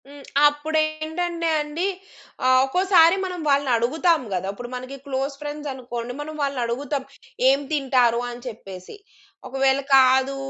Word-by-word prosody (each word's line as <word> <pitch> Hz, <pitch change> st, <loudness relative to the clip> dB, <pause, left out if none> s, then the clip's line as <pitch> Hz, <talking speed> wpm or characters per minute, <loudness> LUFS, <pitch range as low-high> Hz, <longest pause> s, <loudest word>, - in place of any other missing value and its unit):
హ్మ్. 285 Hz, 0 st, -13 dB, 0.2 s
అప్పుడేంటంటే 315 Hz, +3 st, -1 dB
అండి 300 Hz, +5 st, -2 dB, 0.6 s
ఆహ్, 255 Hz, 0 st, +5 dB
ఒక్కోసారి 355 Hz, +2 st, +4 dB
మనం 365 Hz, -1 st, -5 dB
వాళ్ళని 280 Hz, -1 st, +2 dB
అడుగుతాం 315 Hz, +8 st, +2 dB
కదా! 185 Hz, +1 st, -2 dB
ఇప్పుడు 240 Hz, +4 st, -8 dB
మనకి 255 Hz, +2 st, -7 dB
క్లోజ్ 275 Hz, 0 st, -2 dB
ఫ్రెండ్స్ 295 Hz, 0 st, -5 dB
అనుకోండి. 245 Hz, -2 st, -6 dB
మనం 310 Hz, +1 st, -7 dB
వాళ్ళనడుగుతాం. 275 Hz, +1 st, -2 dB, 0.5 s
"ఏం 275 Hz, +1 st, +3 dB
తింటారు?" 255 Hz, -5 st, +2 dB
అని 240 Hz, 0 st, -9 dB
చెప్పేసి. 195 Hz, -, -9 dB, 0.5 s
ఒకవేళ 270 Hz, +1 st, +1 dB, 0.2 s
కాదు, 265 Hz, +1 st, +4 dB
275 Hz, 125 wpm, -23 LUFS, 255-310 Hz, 0.6 s, ఆహ్